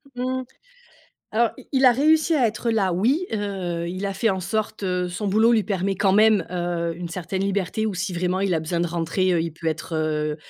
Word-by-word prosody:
Mmh, 255 Hz, +1 st, -2 dB, 0.9 s
alors, 235 Hz, +1 st, +3 dB
i -, -, -13 dB
il 265 Hz, -1 st, +4 dB
a 250 Hz, -, +8 dB
réussi 315 Hz, +5 st, +3 dB
à 260 Hz, -5 st, +3 dB
être 230 Hz, +2 st, -2 dB
là, 195 Hz, -5 st, +1 dB
oui, 250 Hz, -, +1 dB
heu, 190 Hz, -5 st, -3 dB
il 185 Hz, +3 st, -4 dB
a 195 Hz, -, -1 dB
fait 225 Hz, +4 st, 0 dB
en 190 Hz, -2 st, 0 dB
sorte, 215 Hz, +3 st, -3 dB
heu, 180 Hz, -1 st, -1 dB
son 175 Hz, +4 st, -4 dB
boulot 220 Hz, +4 st, +4 dB
lui 220 Hz, -3 st, +3 dB
permet 195 Hz, -1 st, -1 dB
quand 190 Hz, 0 st, +2 dB
même, 215 Hz, -3 st, +5 dB
heu, 175 Hz, -1 st, -2 dB
une 175 Hz, +1 st, -6 dB
certaine 180 Hz, +2 st, -4 dB
liberté 200 Hz, +2 st, -1 dB
ou 210 Hz, -, -2 dB
si 180 Hz, 0 st, -3 dB
vraiment 180 Hz, +2 st, -1 dB
il 195 Hz, -2 st, +1 dB
a 165 Hz, -, +1 dB
besoin 170 Hz, +2 st, -2 dB
de 175 Hz, -, +1 dB
rentrer, 175 Hz, +2 st, 0 dB
heu, 170 Hz, -, +2 dB
il 165 Hz, -, -2 dB
peut 165 Hz, +1 st, -9 dB
être, 160 Hz, +1 st, -3 dB
heu 155 Hz, -1 st, -1 dB
190 Hz, 230 wpm, -23 LUFS, 175-220 Hz, 0.9 s, a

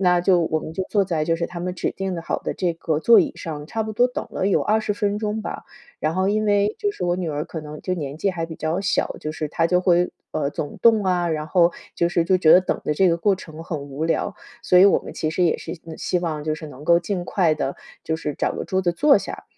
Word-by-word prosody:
那 180 Hz, -2 st, +4 dB
就 180 Hz, 0 st, +4 dB
我 160 Hz, -1 st, 0 dB
们 155 Hz, -, -7 dB
就 190 Hz, -, -2 dB
坐 205 Hz, -2 st, +2 dB
在 165 Hz, -5 st, -1 dB
就 165 Hz, +1 st, +1 dB
是 170 Hz, 0 st, -2 dB
他 175 Hz, -, -8 dB
们 180 Hz, +1 st, -3 dB
指 180 Hz, -, -2 dB
定 190 Hz, -3 st, -3 dB
好 -, -, -2 dB
的 -, -, -3 dB
这 180 Hz, -2 st, 0 dB
个 160 Hz, -2 st, -1 dB
座 235 Hz, +6 st, +7 dB
椅 -, -, -1 dB
上， 150 Hz, -3 st, -6 dB
差 225 Hz, +6 st, -2 dB
不 220 Hz, 0 st, -5 dB
多 245 Hz, +4 st, +4 dB
等 250 Hz, -, -5 dB
了 190 Hz, -, -1 dB
有 200 Hz, -, +3 dB
20 215 Hz, 0 st, +1 dB
分 205 Hz, 0 st, -1 dB
钟 210 Hz, 0 st, -2 dB
吧， -, -, -6 dB, 0.4 s
然 155 Hz, +1 st, 0 dB
后 190 Hz, +1 st, +1 dB
因 215 Hz, +1 st, +1 dB
为 205 Hz, 0 st, +2 dB
就 415 Hz, -, 0 dB
是 180 Hz, -, -5 dB
我 175 Hz, 0 st, +1 dB
女 180 Hz, -2 st, -3 dB
儿 150 Hz, 0 st, -2 dB
可 160 Hz, -1 st, -6 dB
能 150 Hz, 0 st, -9 dB
就 185 Hz, -, -1 dB
年 145 Hz, -5 st, -5 dB
纪 195 Hz, +5 st, 0 dB
还 170 Hz, -3 st, -3 dB
比 165 Hz, -, -8 dB
较 160 Hz, +4 st, -1 dB
小， 195 Hz, -, 0 dB
就 155 Hz, -, -4 dB
是 155 Hz, -1 st, -4 dB
她 165 Hz, +2 st, +1 dB
就 180 Hz, +1 st, +2 dB
会 180 Hz, -1 st, +2 dB, 0.2 s
呃， 140 Hz, -2 st, -1 dB
总 145 Hz, -, -5 dB
动 225 Hz, -2 st, +5 dB
啊， 180 Hz, -2 st, +1 dB
然 155 Hz, -2 st, -2 dB
后 175 Hz, -1 st, +4 dB, 0.2 s
就 170 Hz, -, +2 dB
是 170 Hz, -1 st, +1 dB
就 185 Hz, +2 st, +3 dB
觉 160 Hz, -3 st, +6 dB
得 180 Hz, -, +8 dB
等 185 Hz, -, -2 dB
的 150 Hz, -, 0 dB
这 190 Hz, +4 st, +4 dB
个 170 Hz, -, +2 dB
过 195 Hz, +4 st, +2 dB
程 160 Hz, -3 st, -10 dB
很 160 Hz, -2 st, -4 dB
无 140 Hz, +2 st, -5 dB
聊， 165 Hz, -, 0 dB, 0.3 s
所 180 Hz, -, +4 dB
以 185 Hz, -, +8 dB
我 200 Hz, -, +5 dB
们 -, -, -9 dB
其 155 Hz, -, -2 dB
实 180 Hz, -, 0 dB
也 170 Hz, -, +2 dB
是， 165 Hz, -, -6 dB
嗯， 160 Hz, -1 st, -8 dB
希 180 Hz, -, -1 dB
望 160 Hz, -4 st, -3 dB
就 155 Hz, 0 st, 0 dB
是 155 Hz, -1 st, -8 dB
能 145 Hz, 0 st, -11 dB
够 170 Hz, +1 st, +5 dB
尽 180 Hz, 0 st, -3 dB
快 175 Hz, -5 st, +2 dB
地 140 Hz, -2 st, -3 dB, 0.3 s
就 160 Hz, -, -1 dB
是 150 Hz, -2 st, -4 dB
找 -, -, -1 dB
个 -, -, -4 dB
桌 190 Hz, -, 0 dB
子 175 Hz, -, +2 dB
坐 285 Hz, -, +5 dB
下。 -, -, -7 dB
175 Hz, 300 characters per minute, -22 LUFS, 160-190 Hz, 0.4 s, 得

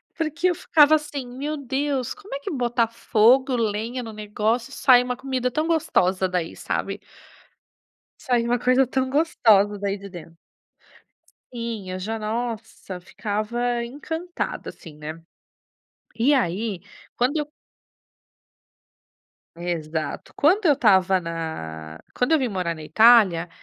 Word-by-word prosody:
Porque 325 Hz, +2 st, -1 dB
eu 355 Hz, -, 0 dB
ficava 310 Hz, -1 st, +5 dB
assim: 290 Hz, -3 st, -4 dB
"Meu 285 Hz, +5 st, -4 dB
Deus, 270 Hz, -1 st, -2 dB
como 415 Hz, -8 st, -9 dB
é -, -, -4 dB
que 280 Hz, -, -5 dB
botar 240 Hz, -4 st, +1 dB
fogo, 240 Hz, +3 st, +3 dB
lenha 230 Hz, +2 st, -2 dB
no 225 Hz, -1 st, -8 dB
negócio, 215 Hz, +4 st, -2 dB
sai 250 Hz, -3 st, +5 dB
uma 250 Hz, 0 st, -3 dB
comida 255 Hz, -1 st, -2 dB
tão 310 Hz, +5 st, -1 dB
gostosa 190 Hz, -, +1 dB
daí", 180 Hz, -2 st, -3 dB
sabe. -, -, -3 dB, 1.2 s
Sai 245 Hz, -4 st, +1 dB
uma 240 Hz, 0 st, 0 dB
coisa 255 Hz, +2 st, +3 dB
tão 260 Hz, 0 st, -1 dB
gostosa 220 Hz, -9 st, +3 dB
daí 200 Hz, 0 st, -2 dB
de 200 Hz, 0 st, -10 dB
dentro. 165 Hz, -2 st, -11 dB, 1.2 s
Sim, 230 Hz, -5 st, -5 dB
eu 185 Hz, -, -4 dB
já, 220 Hz, +4 st, -3 dB
nossa, 220 Hz, -4 st, -5 dB
ficava 235 Hz, +5 st, -2 dB
encantada, 320 Hz, +7 st, -5 dB
assim, 155 Hz, -4 st, -12 dB
né. 155 Hz, +2 st, -7 dB, 0.9 s
E 250 Hz, +6 st, +3 dB
aí, 200 Hz, -4 st, 0 dB, 0.4 s
quando 255 Hz, +6 st, +1 dB
eu 300 Hz, -1 st, -2 dB, 2.1 s
Exato. 165 Hz, -2 st, -4 dB
Quando 365 Hz, +8 st, +3 dB
eu 295 Hz, -, +6 dB
estava 190 Hz, -6 st, +4 dB
na 80 Hz, -, -6 dB, 0.2 s
quando 250 Hz, +6 st, 0 dB
eu 320 Hz, -, +5 dB
vim 255 Hz, -, 0 dB
morar 180 Hz, -5 st, -2 dB
na 155 Hz, -1 st, -10 dB
Itália, 190 Hz, -2 st, +5 dB
235 Hz, 130 wpm, -23 LUFS, 190-265 Hz, 2.1 s, eu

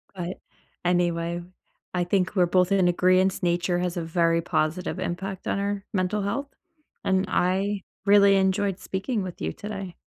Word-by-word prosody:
But, 180 Hz, 0 st, -5 dB, 0.4 s
anyway, 175 Hz, -1 st, 0 dB, 0.5 s
I 180 Hz, -1 st, +1 dB
think 185 Hz, +2 st, 0 dB
we're 180 Hz, -2 st, +5 dB
both 180 Hz, +2 st, +2 dB
in 190 Hz, -2 st, +4 dB
agreeance, 185 Hz, +2 st, +3 dB
nature 175 Hz, +1 st, +1 dB
has 180 Hz, 0 st, -2 dB
a 175 Hz, -, -2 dB
very 165 Hz, 0 st, +1 dB
positive 175 Hz, +3 st, -1 dB
impact 185 Hz, +1 st, -4 dB
on 195 Hz, -, 0 dB
our 200 Hz, 0 st, -2 dB
mental 195 Hz, +2 st, 0 dB
health, 275 Hz, +8 st, -2 dB, 0.6 s
and 190 Hz, 0 st, +2 dB
I 190 Hz, +2 st, 0 dB, 0.2 s
really 200 Hz, -1 st, +6 dB
enjoyed 190 Hz, 0 st, +1 dB
speaking 200 Hz, +3 st, -2 dB
with 180 Hz, -2 st, -7 dB
you 80 Hz, +1 st, -2 dB
today. 195 Hz, -4 st, -6 dB
185 Hz, 155 wpm, -25 LUFS, 175-195 Hz, 0.6 s, really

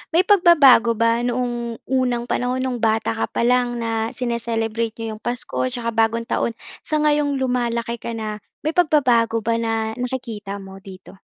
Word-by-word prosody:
may 355 Hz, -, +5 dB
pagbabago 300 Hz, -, +6 dB
ba 230 Hz, +1 st, +2 dB
noong 240 Hz, -1 st, -2 dB
unang 250 Hz, -2 st, 0 dB
panahon, 250 Hz, +1 st, -1 dB
nung 255 Hz, -2 st, -2 dB
bata 225 Hz, 0 st, +1 dB
ka 225 Hz, -, -2 dB
pa -, -, -2 dB
lang 245 Hz, 0 st, +2 dB
na 225 Hz, -1 st, -2 dB
sini-celebrate 230 Hz, -2 st, -2 dB
niyo 225 Hz, -1 st, -4 dB
yung 215 Hz, -, -15 dB
Pasko 250 Hz, +2 st, -2 dB
tsaka 240 Hz, -2 st, -3 dB
Bagong 225 Hz, +1 st, +1 dB
Taon, 230 Hz, 0 st, -1 dB, 0.3 s
sa 310 Hz, -, -1 dB
ngayong 295 Hz, -1 st, +2 dB
lumalaki 235 Hz, -2 st, -1 dB
ka 235 Hz, -, -5 dB
na? 215 Hz, -1 st, -5 dB, 0.3 s
May 310 Hz, -, +1 dB
pagbabago 245 Hz, -9 st, +2 dB
ba 230 Hz, +1 st, 0 dB
na 225 Hz, -1 st, -1 dB
nakikita 230 Hz, -6 st, -4 dB
mo 195 Hz, -1 st, -11 dB
dito? 190 Hz, -1 st, -13 dB
235 Hz, 165 wpm, -21 LUFS, 225-250 Hz, 0.3 s, pagbabago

